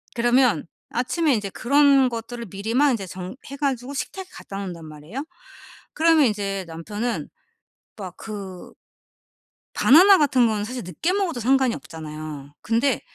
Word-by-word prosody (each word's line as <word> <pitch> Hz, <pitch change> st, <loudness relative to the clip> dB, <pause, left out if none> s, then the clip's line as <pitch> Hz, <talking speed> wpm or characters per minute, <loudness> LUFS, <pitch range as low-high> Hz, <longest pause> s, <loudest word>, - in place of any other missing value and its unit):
그러면 240 Hz, -, +3 dB, 0.2 s
아침에 275 Hz, +5 st, +1 dB
인제 205 Hz, -3 st, -1 dB
그런 275 Hz, +2 st, +4 dB
것들을 235 Hz, 0 st, -6 dB
미리 200 Hz, +5 st, -5 dB
막 285 Hz, +2 st, +5 dB
인제 205 Hz, -6 st, -2 dB
정해 185 Hz, +3 st, -7 dB, 0.2 s
가지고 270 Hz, -1 st, -2 dB
식탁에 375 Hz, +6 st, -5 dB
갖다 195 Hz, -, -9 dB
놓는단 180 Hz, -5 st, -6 dB
말이에요. 155 Hz, -, -8 dB, 0.7 s
그러면 320 Hz, -2 st, +4 dB
인제 195 Hz, -3 st, -2 dB
남편은 205 Hz, +9 st, -4 dB, 0.7 s
막 185 Hz, -4 st, -7 dB
그 195 Hz, -4 st, -8 dB, 1.0 s
바나나 370 Hz, +8 st, +7 dB
같은 260 Hz, -5 st, +4 dB
건 210 Hz, -2 st, -1 dB
사실 250 Hz, +2 st, -5 dB
늦게 180 Hz, -, -2 dB
먹어도 370 Hz, -10 st, -1 dB
상관이 260 Hz, 0 st, +3 dB
없잖아요. 155 Hz, -3 st, -8 dB
근데 235 Hz, +3 st, +1 dB
230 Hz, 305 characters per minute, -23 LUFS, 190-270 Hz, 1.0 s, 바나나